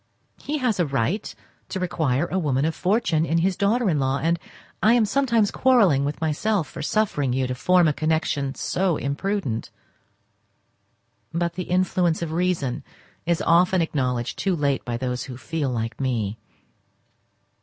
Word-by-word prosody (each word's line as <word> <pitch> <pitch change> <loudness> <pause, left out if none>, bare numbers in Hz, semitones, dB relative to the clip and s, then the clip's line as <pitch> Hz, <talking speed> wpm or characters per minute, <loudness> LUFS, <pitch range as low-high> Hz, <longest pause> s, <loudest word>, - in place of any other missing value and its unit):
He 300 +2 -2
has 250 -8 0
a 175 - +3
right 140 - -1 0.4
to 190 - -3
require 160 -5 0
a 185 +2 -1
woman 140 -4 +1
of 160 - 0
fortune 185 -5 +1
in 165 0 0
his 185 +3 +1
daughter 220 +5 +1
in 155 -5 +2
law, 135 0 +1
and 165 +2 0 0.4
I 215 +5 +5
am 235 -3 +4
sometimes 235 -3 +2
quarrelling 205 - +4
with 145 - -3
myself 165 +4 0
for - - -8
suffering 150 - 0
you 130 0 0
to 125 - -2
form 180 +6 +3
a 150 - +2
connection 150 -3 -1
so 180 -4 0
imprudent; 140 - -2 1.6
but 170 +1 -1
the 180 - -4
influence 180 -2 +1
of 160 - -4
reason 160 -6 -1 0.4
is 170 -1 +1
often 180 +2 +4
acknowledged 125 -7 -1
too 190 -3 +1
late 140 -4 0
by 120 -1 -3
those 125 0 -3
who 125 -2 -8
feel 155 0 -2
like 115 +1 -3
me. 115 -5 -1
165 Hz, 160 wpm, -24 LUFS, 135-185 Hz, 1.6 s, I